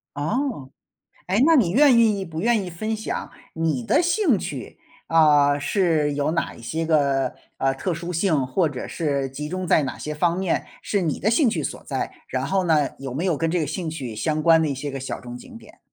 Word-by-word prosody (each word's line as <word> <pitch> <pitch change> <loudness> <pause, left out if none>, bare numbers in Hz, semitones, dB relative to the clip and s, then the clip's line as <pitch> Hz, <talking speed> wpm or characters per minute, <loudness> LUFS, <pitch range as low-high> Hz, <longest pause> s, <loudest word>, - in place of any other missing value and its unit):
哦， 160 - -2 0.6
哎， 195 +4 +1
那 330 - +6
你 200 - +3
愿 270 +1 +6
意 215 -4 +3
不 160 -2 -6
愿 230 -2 +2
意 180 - -6
分 215 +6 -3
享 220 - -5 0.2
你 160 -6 -1
的 215 - +3
兴 350 - +2
趣， 135 -8 -6 0.3
啊， 150 -3 +5
是 155 -1 +1
有 145 +2 0
哪 170 - -1
一 - - -14
些 160 +7 -3
个， 140 -4 +2 0.2
呃， 135 0 +1
特 175 +7 -2
殊 170 +2 -5
性 160 -6 +1
或 160 +6 +1
者 130 -3 -6
是 140 -5 -1
集 150 +3 -6
中 185 +1 -3
在 160 - +3
哪 135 - -4
些 150 - -5
方 170 +3 +1
面， 190 -3 -1 0.2
是 200 -2 0
你 160 -4 -1
的 215 +5 +1
兴 250 +1 +4
趣 - - -2
所 - - -5
在？ - - -3 0.2
然 - - -2
后 190 -1 +1
呢， 150 -4 +3
有 135 -2 -6
没 160 +8 -2
有 180 -4 +2
跟 165 +2 -1
这 175 +1 0
个 155 - 0
兴 160 +3 -4
趣 130 -8 -6
相 155 +6 -1
关 165 -1 +6
的 155 - +1
一 140 - -2
些 140 +2 -5
个 135 - -5
小 130 - -5
众 120 -1 -9
景 230 - -11
点？ - - -17
160 Hz, 240 characters per minute, -23 LUFS, 145-190 Hz, 0.6 s, 那